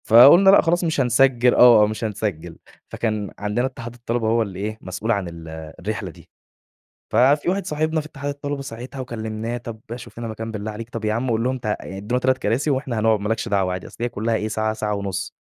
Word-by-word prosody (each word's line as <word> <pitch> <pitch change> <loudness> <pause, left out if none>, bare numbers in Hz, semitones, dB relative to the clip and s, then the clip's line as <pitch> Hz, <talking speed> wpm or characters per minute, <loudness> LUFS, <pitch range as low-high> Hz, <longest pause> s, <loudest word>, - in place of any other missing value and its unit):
فقُلنا 140 - +8
لأ 195 - +8
خلاص 175 +2 +1
مش 160 -4 +1
هنسجِّل 125 0 +4
آه، 120 -4 +7
مش 110 +2 -5
هنسجِّل، 95 -6 -3 0.3
فكان 110 -3 -2
عندنا 105 +5 0
اتحاد 120 -3 -6
الطلبة 120 -1 -2
هو 115 +1 +3
اللي 95 -4 -4
إيه، 110 +2 -3
مسؤول 95 +5 -3
عن 100 -5 0
ال 85 -1 -9 0.3
الرحلة 105 -1 -4
دي، - - -18 0.8
ففي 135 +8 +4
واحد 190 +1 0
صاحبنا 155 0 0
في 150 - -8
اتحاد 145 -2 -6
الطلبة 145 0 -4
ساعتها 130 +2 -8
وكلمناه 115 -1 -4
طَب 115 -2 -8 0.2
شوف 120 - -11
لنا 115 -1 -4
مكان 110 +1 -5
بالله 110 0 -4
عليك، 115 +2 -8
طَب 115 -2 -5
يا 105 - +1
عُم 120 +2 -1
قُل 115 0 +1
لهم 130 +1 0
ت 125 - -23
يعني 105 -3 -3
ادّونا 120 +6 -1
3 130 0 +2
كراسي 120 +8 0
وإحنا 130 -4 -1
هنقعد 110 -1 +3
ما 105 - -3
لكش 115 +1 -1
دعوة 95 -3 +1
عادي، 90 0 -5
أصل - - -14
هي 120 - +1
كلّها 115 0 -2
إيه، 110 -1 -1
ساعة 110 0 -1
ساعة 105 -1 -2
ونُص، 95 -1 -4
115 Hz, 220 wpm, -22 LUFS, 105-130 Hz, 0.8 s, فقُلنا